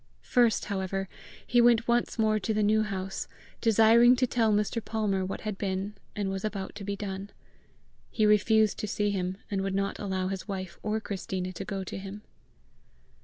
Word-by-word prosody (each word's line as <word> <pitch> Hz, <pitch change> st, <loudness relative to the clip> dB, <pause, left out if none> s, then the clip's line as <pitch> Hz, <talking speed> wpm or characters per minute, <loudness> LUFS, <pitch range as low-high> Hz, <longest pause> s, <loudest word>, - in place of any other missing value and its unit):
First, 240 Hz, -3 st, +3 dB
however, 195 Hz, -1 st, -2 dB, 0.4 s
he 240 Hz, 0 st, +4 dB
went 235 Hz, -1 st, +4 dB
once 240 Hz, +1 st, +1 dB
more 215 Hz, -1 st, +2 dB
to 215 Hz, +2 st, -1 dB
the 215 Hz, -, +2 dB
New 215 Hz, +1 st, +3 dB
House, 195 Hz, -2 st, -3 dB, 0.3 s
desiring 230 Hz, +2 st, +6 dB
to 255 Hz, +1 st, +2 dB
tell 230 Hz, -3 st, +2 dB
Mr. 210 Hz, +2 st, 0 dB
Palmer 210 Hz, -4 st, -1 dB
what 185 Hz, -, -4 dB
had 210 Hz, -3 st, -4 dB
been 195 Hz, +1 st, -2 dB, 0.2 s
and 200 Hz, -2 st, -1 dB
was 195 Hz, 0 st, -4 dB
about 200 Hz, -3 st, -4 dB
to 205 Hz, -, -8 dB
be 200 Hz, +1 st, -3 dB
done. 195 Hz, 0 st, -5 dB, 0.8 s
He 215 Hz, -, +1 dB
refused 210 Hz, 0 st, +4 dB
to 210 Hz, -, -2 dB
see 205 Hz, 0 st, 0 dB
him, 185 Hz, -1 st, -2 dB
and 195 Hz, -1 st, 0 dB
would 195 Hz, 0 st, -2 dB
not 195 Hz, 0 st, -1 dB
allow 190 Hz, -2 st, -2 dB
his 195 Hz, +1 st, -5 dB
wife 185 Hz, -3 st, -5 dB
or 215 Hz, +1 st, -1 dB
Christina 190 Hz, -3 st, -4 dB
to 195 Hz, -, -6 dB
go 195 Hz, 0 st, -3 dB
to 190 Hz, -, -6 dB
him. 200 Hz, +2 st, -8 dB
205 Hz, 185 wpm, -28 LUFS, 195-220 Hz, 0.8 s, desiring